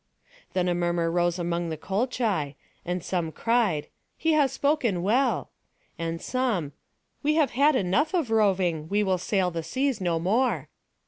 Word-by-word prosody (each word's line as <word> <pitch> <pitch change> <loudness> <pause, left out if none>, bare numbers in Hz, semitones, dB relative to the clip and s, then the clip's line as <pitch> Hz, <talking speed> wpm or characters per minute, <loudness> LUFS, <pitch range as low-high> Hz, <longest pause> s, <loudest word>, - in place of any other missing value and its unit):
Then 180 -1 +1
a 175 - +2
murmur 175 -1 0
rose 175 0 +1
among 170 -1 -2
the 160 - -4
Colchi, 195 - -1 0.3
and 180 -1 -3
some 170 -4 -2
cried, 220 -8 +1 0.3
"He 320 0 +1
has 290 -3 +3
spoken 255 - +1
well"; 245 +8 +1 0.5
and 165 0 -3
some, 235 - -1 0.5
"We 300 +1 +2
have 310 -4 +3
had 285 +3 +4
enough 255 - +1
of 310 -10 0
roving, 185 -7 +2
we 205 +1 +2
will 190 -2 +1
sail 185 0 0
the 165 -1 -3
seas 255 - -1
no 175 -2 +1
more!" 195 - +1
190 Hz, 155 wpm, -26 LUFS, 170-250 Hz, 0.5 s, had